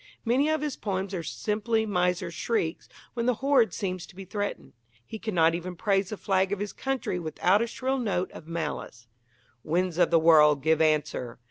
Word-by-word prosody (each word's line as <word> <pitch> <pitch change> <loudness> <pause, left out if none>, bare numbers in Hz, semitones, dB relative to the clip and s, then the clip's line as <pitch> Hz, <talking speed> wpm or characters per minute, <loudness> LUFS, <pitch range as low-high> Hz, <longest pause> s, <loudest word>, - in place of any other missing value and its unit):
Many 260 +6 +2
of 315 -1 +1
his 300 -2 -3
poems 195 -1 -3
are 180 - -2
simply 220 +5 -1
miser's 180 -3 0
shrieks 170 -5 -2 0.2
when 235 0 -2
the 250 - +3
hoard 270 -2 +3
seems 185 -4 -4
to - - -17
be 195 0 -8
threatened. 205 +1 -4 0.3
He 220 - -8
cannot 170 -7 +2
even 175 +1 -4
praise 195 0 +1
the 215 - -5
flag 190 -1 +1
of 205 - 0
his 205 +1 -4
country 265 -9 -2
without 180 +5 +2
a 235 - 0
shrill 265 +3 -2
note 185 -6 -1
of 155 - -11
malice: 155 -7 -5 0.6
Winds 175 +2 0
of 175 - +4
the 170 - +5
world, 150 -3 +5
give 160 0 +3
answer! 150 -6 0
185 Hz, 190 wpm, -27 LUFS, 165-220 Hz, 0.6 s, the